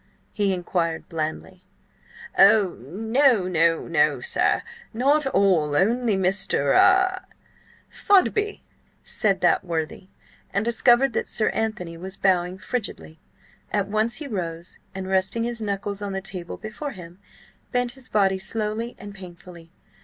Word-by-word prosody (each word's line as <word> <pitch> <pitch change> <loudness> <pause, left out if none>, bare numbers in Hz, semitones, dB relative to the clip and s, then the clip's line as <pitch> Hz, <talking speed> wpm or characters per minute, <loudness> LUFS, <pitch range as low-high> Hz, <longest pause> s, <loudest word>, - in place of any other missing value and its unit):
he 205 -2 0
inquired 175 -2 -2
blandly. 165 +3 -5 0.7
"Oh, 200 0 +6
no, 220 - +1
no, 165 -2 +1
no, 150 -3 +2
sir! - - 0 0.3
Not 280 +4 +3
all–Only 195 - +2
Mr.–er—" 205 - +3 0.7
"Fudby," 410 +1 +1 0.4
said 200 -4 +1
that - - +3
worthy, 165 +1 -4 0.4
and 200 +2 -1
discovered 240 +3 +4
that - - -1
Sir 215 - +1
Anthony 180 -7 -3
was 190 +3 -6
bowing 180 -1 +1
frigidly. 190 - -5 0.5
At 200 -1 0
once 215 +3 0
he 310 - -7
rose, 175 -8 -5 0.2
and 190 -1 -5
resting 190 +4 +1
his 235 -1 -3
knuckles 200 -1 -3
on 200 -1 -4
the 195 - -2
table 185 -2 -7
before 275 +7 -6
him, 175 0 -12 0.5
bent 245 -1 0
his 255 0 -11
body 195 -2 +2
slowly 220 +3 -3
and 205 -2 -10
painfully. 175 -3 -12
195 Hz, 125 wpm, -24 LUFS, 175-230 Hz, 0.7 s, Oh